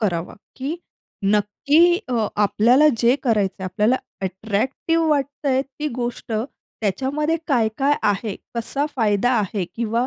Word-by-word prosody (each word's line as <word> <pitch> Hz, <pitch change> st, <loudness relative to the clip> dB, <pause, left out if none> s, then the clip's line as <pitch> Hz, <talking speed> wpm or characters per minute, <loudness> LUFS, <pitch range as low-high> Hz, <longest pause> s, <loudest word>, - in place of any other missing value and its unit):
करावा, 175 Hz, -5 st, -1 dB, 0.2 s
की 280 Hz, +5 st, -3 dB, 0.5 s
नक्की 280 Hz, -, +3 dB
अ, 230 Hz, -4 st, +1 dB
आपल्याला 235 Hz, +8 st, +4 dB
जे 240 Hz, +2 st, +4 dB
करायचं 200 Hz, -6 st, 0 dB
आपल्याला 210 Hz, +7 st, +2 dB, 0.3 s
अट्रॅक्टिव्ह 220 Hz, -, -1 dB
वाटतं 285 Hz, -1 st, 0 dB
आहे 265 Hz, 0 st, +2 dB
ती 290 Hz, +2 st, -5 dB
गोष्ट, 240 Hz, -1 st, -4 dB
त्याच्यामध्ये 265 Hz, -, -2 dB
काय-काय 265 Hz, +2 st, +2 dB
आहे? 205 Hz, 0 st, 0 dB, 0.2 s
कसा 240 Hz, +5 st, -1 dB
फायदा 215 Hz, 0 st, +2 dB
आहे? 200 Hz, -2 st, -1 dB
किंवा 235 Hz, +1 st, 0 dB
235 Hz, 120 wpm, -22 LUFS, 210-275 Hz, 0.5 s, आपल्याला